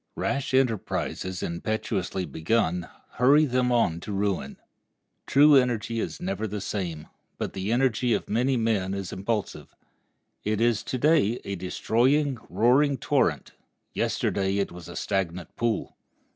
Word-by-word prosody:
Rash 140 -1 -1
enterprises 110 -6 -1
impetuously 95 +1 -2
begun 85 +3 0 0.3
hurry 140 +5 +6
them 125 -2 +1
on 115 -9 +2
to 105 - -7
ruin. 100 -8 -2 0.7
True 145 +2 +6
energy 120 -3 +1
is - - -4
ever 180 - -3
the 105 0 -4
same; 90 -6 -4 0.3
but - - -4
the 95 +3 -3
energy 125 -1 +2
of - - -4
many 125 +4 +1
men 105 -4 0
is 100 -2 -5
impulsive. 105 +2 -3 0.7
It 105 0 0
is 115 -3 +2
to 130 - -2
day 140 -5 +3
a 100 - -3
destroying, 125 - +1
roaring 135 +5 +3
torrent; - - 0 0.4
yesterday 95 0 0
it 100 - -1
was 85 -1 -10
a - - -9
stagnant 90 -2 -3
pool. 115 -2 -1
110 Hz, 135 wpm, -26 LUFS, 95-125 Hz, 0.7 s, hurry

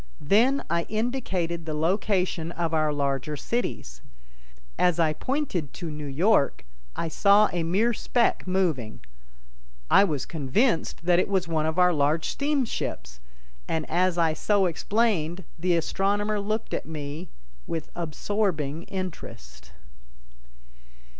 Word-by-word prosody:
Then 235 - +3
I 170 0 -1
indicated 195 -8 -2
the 155 - -2
location 180 0 0
of 165 -2 -2
our 155 -1 +2
larger 140 0 -1
cities. 60 - -3 0.8
As 180 -2 +3
I 160 -2 +3
pointed 225 - -2
to 170 -3 -5
New 150 -1 -6
York, 145 - +2 0.3
I 170 - -2
saw 200 +5 +5
a 175 - 0
mere 200 +9 +2
speck 235 -2 0
moving. 165 - -1 0.9
I - - +7
was 150 -9 -1
convinced 165 - 0
that 175 0 +4
it - - +1
was 190 -3 +1
one 160 -2 0
of 160 +2 -2
our 180 -1 +5
large 150 +2 +1
steamships, 270 - -2 0.5
and 160 -1 -2
as 180 +1 +2
I 165 -2 +3
so 200 +4 +2
explained 185 -1 0 0.2
the 175 +1 +2
astronomer 205 +5 0
looked 215 +2 -3
at - - -3
me 155 +2 -6 0.4
with 165 -2 -4
absorbing 165 -2 -2
interest. 65 - -7
170 Hz, 125 wpm, -26 LUFS, 155-200 Hz, 0.9 s, I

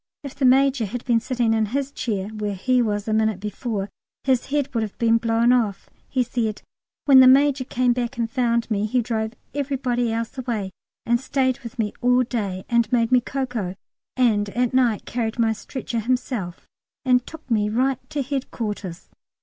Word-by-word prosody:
If 280 -2 -7
the 275 -2 -1
Major 265 -1 +4
had 240 +4 -6
been 235 -3 +3
sitting 235 -1 0
in 220 -1 +1
his 275 +5 -2
chair 205 -7 -3
where 210 -2 -3
he 250 +6 +2
was 210 -2 -1
a 215 - 0
minute 220 -3 +1
before, 210 0 -3 0.4
his 260 -3 +1
head 285 -1 -1
would 230 - 0
have 215 -2 -5
been 230 -1 +3
blown 230 +1 +2
off. 220 -6 -1 0.2
He 255 -2 +1
said, 230 -3 -2 0.4
"When 275 -2 +8
the 260 - +9
Major 275 +1 +5
came 250 -1 +1
back 240 +1 -3
and 230 -1 0
found 235 0 0
me, 210 0 +1
he 250 +4 +1
drove 220 -1 -2 0.2
everybody 255 -4 -1
else 230 0 -3
away 225 -7 -3 0.3
and 235 +1 +2
stayed 260 -1 0
with 240 +2 -10
me 215 -3 -1
all 250 +1 +4
day, 200 -6 -3
and 235 -2 +2
made 235 -1 +2
me 250 -1 +5
cocoa, 245 -8 -3 0.4
and 215 -5 +2
at 245 +3 0
night 245 -5 +2
carried 230 -1 -2
my 225 -2 +2
stretcher 235 +1 -5
himself 230 -6 -2 0.4
and 250 -1 +3
took 320 -1 -11
me 210 -2 +2
right 255 +3 +1
to 290 -2 -2
Headquarters." 215 - -4
235 Hz, 185 wpm, -23 LUFS, 220-255 Hz, 0.4 s, the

